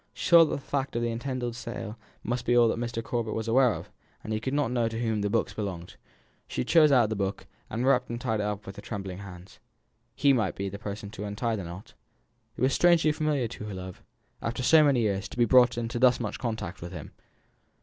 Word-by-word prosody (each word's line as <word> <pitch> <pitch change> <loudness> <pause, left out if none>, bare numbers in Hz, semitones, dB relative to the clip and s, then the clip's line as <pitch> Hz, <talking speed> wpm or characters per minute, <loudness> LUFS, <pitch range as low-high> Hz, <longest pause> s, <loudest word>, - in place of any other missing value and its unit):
She - - -3
saw 170 -1 +9
that - - -4
the - - -1
fact 135 -1 -3
of 120 - 0
the 120 - 0
intended 120 0 -3
sale 115 -2 -6 0.3
must 120 +2 -2
be 120 0 +2
all 120 -1 +6
that 115 - -1
Mr. 115 -1 -3
Corbet 115 -2 -2
was 110 0 -3
aware 125 +1 +4
of, - - -9 0.3
and 110 - -6
that - - 0
he - - -1
could 130 +4 -2
not 145 -5 +1
know 120 -2 +1
to 115 0 -4
whom 110 -3 0
the 105 - 0
books 115 +2 0
belonged. 90 -5 -5 0.5
She - - -2
chose 155 +2 +5
out 120 -5 +4
the - - 0
book, 100 0 -3 0.2
and 120 +3 -2
wrapped 125 -2 +3
and 120 0 -4
tied 110 -3 -1
it - - 0
up 105 0 -4
with 95 +1 -8
trembling 95 -4 -6
hands. 95 -1 -11 0.6
He 140 -1 +4
might 110 -7 0
be 100 0 -3
the 100 +1 -8
person 100 -1 -6
to 105 - -6
untie 110 +3 -2
the 100 -4 -5
knot. 90 +4 -10 0.6
It - - -7
was 130 +1 +3
strangely 170 -3 +4
familiar 150 -5 0
to 105 - -8
her 105 -2 -6
love, 95 0 -8 0.4
after 120 +2 -3
so 155 +5 +6
many 140 -5 +3
years, 100 -3 -1
to - - -11
be 120 - +4
brought 125 +1 +5
into 120 0 -3
thus 125 -1 +5
much 110 -4 -4
contact 110 -6 -4
with 85 +2 -7
him. 80 -4 -8
115 Hz, 240 wpm, -28 LUFS, 100-125 Hz, 0.6 s, saw